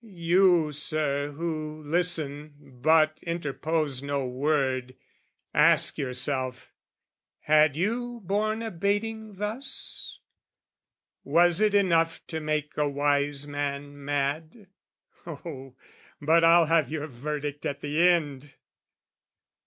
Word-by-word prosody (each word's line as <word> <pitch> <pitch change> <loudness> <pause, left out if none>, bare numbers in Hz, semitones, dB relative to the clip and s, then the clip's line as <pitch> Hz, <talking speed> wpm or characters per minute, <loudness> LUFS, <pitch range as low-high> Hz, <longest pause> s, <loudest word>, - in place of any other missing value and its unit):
You, 175 -4 +2
Sir, 145 -1 0
who 155 -1 -5
listen 155 -3 0 0.3
but 155 +1 +3
interpose 155 -3 -2
no 140 -1 -2
word, 130 -1 -1 0.6
Ask - - +4
yourself, 130 0 -2 0.7
had 150 -1 +4
you 235 +6 -2
borne 215 +4 -1
a 225 - -4
baiting 205 +4 -2
thus? 225 +7 -6 1.1
Was 175 +2 +3
it 210 -1 +3
enough 165 -4 +2
to 160 - -3
make 155 -1 -3
a 150 -1 +1
wise 145 0 0
man 145 0 -5
mad? 145 +8 -3 0.6
Oh, 140 -5 -8 0.4
but 160 +3 +3
I'll 165 0 +6
have 160 -4 +2
your 155 -1 -3
verdict 145 +2 -5
at 140 0 -5
the 155 +5 +3
end! 145 -5 -1
155 Hz, 105 wpm, -27 LUFS, 145-175 Hz, 1.1 s, I'll